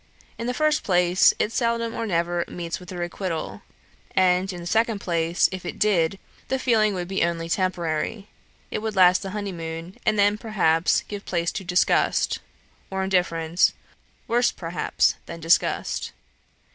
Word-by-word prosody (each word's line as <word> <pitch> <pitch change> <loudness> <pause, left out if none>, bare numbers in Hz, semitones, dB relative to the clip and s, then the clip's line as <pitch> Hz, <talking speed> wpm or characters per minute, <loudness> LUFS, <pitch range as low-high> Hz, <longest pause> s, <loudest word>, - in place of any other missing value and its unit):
In 230 - -3
the 250 - 0
first 305 +1 +2
place, 180 -1 +4
it 210 - 0
seldom 230 -1 0
or 230 - -3
never 170 -1 0
meets 170 -1 -5
with 180 0 -11
a 180 - -6
requital; 175 -1 -4 0.5
and, 185 0 +3
in 180 - -7
the 170 - -8
second 225 +4 +1
place, 170 -2 +1
if 185 -1 -6
it - - -6
did, 195 -4 +2 0.3
the 265 - 0
feeling 220 -5 +2
would 175 -1 -3
be 190 -1 0
only 165 -1 -1
temporary: 185 +2 -1 0.4
it - - -2
would 220 -1 -4
last 185 -1 +6
the 195 - -5
honeymoon, 175 -4 -6
and 215 - +1
then, 205 +1 +3
perhaps, 175 -7 +2
give 205 -1 -6
place 170 -1 -1
to 195 - -5
disgust, 180 0 +2 0.5
or 190 0 -2
indifference, 175 -3 +2 0.5
worse, 240 +1 +2
perhaps, 170 0 0
than 170 - -7
disgust. 165 +2 +1
185 Hz, 160 wpm, -24 LUFS, 170-210 Hz, 0.5 s, last